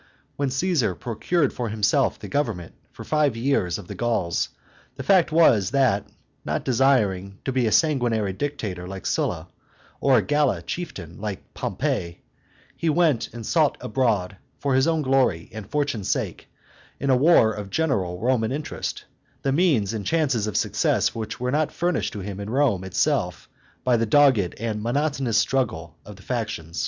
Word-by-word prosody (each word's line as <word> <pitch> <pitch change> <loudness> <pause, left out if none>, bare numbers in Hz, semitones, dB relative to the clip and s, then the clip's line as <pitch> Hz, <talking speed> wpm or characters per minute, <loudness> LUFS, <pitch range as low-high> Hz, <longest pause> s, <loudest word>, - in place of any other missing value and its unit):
When 140 -1 -1
Caesar 130 - 0
procured 130 +6 -1
for 120 -2 -3
himself 105 -1 +1
the - - -9
government 110 - -2 0.2
for - - -10
five 150 -6 +1
years 115 -9 0
of 100 -4 -10
the - - -6
Gauls, 110 -8 -1 0.5
the - - -6
fact 185 -5 +4
was, 115 - +4
that, 125 -7 +2 0.4
not - - -2
desiring 105 -7 +2
to 135 - 0
be 125 -2 +1
a - - 0
sanguinary 120 - +2
dictator 105 -8 -4
like 95 -1 -8
Scylla, - - -1 0.5
or 135 -2 +4
a 110 - +2
gala 145 -2 +1
chieftain 95 - -6
like 105 -3 -6
Pompey, 85 0 -3 0.5
he 165 - -1
went 155 -6 +2
and 115 -2 -8
sought 155 0 +2
abroad, 105 -7 0 0.2
for 140 -1 -1
his 130 +3 +3
own 160 -2 +1
glory 130 - +1
and 110 -2 -8
fortune's 140 -8 -1
sake, - - -2 0.5
in 140 - +1
a - - +5
war 125 -5 +5
of 105 -2 -6
general 100 - -1
Roman 120 0 +1
interest, 145 +2 -4 0.4
the 135 - +1
means 135 - +2
and 110 -2 -3
chances 135 -7 +1
of 105 - -1
success - - +1
which 110 -1 -5
were 125 0 -1
not 150 +2 +1
furnished 175 -1 -1
to 105 - -5
him 100 0 -6
in 100 +1 -5
Rome 125 -7 +1
itself 95 - -1 0.4
by 125 -2 +3
the 115 0 0
dogged 125 -8 +4
and 110 -2 -2
monotonous 135 0 0
struggle 85 - 0
of 105 - -11
the 95 - -16
factions. 110 -10 -4
120 Hz, 165 wpm, -24 LUFS, 100-140 Hz, 0.5 s, a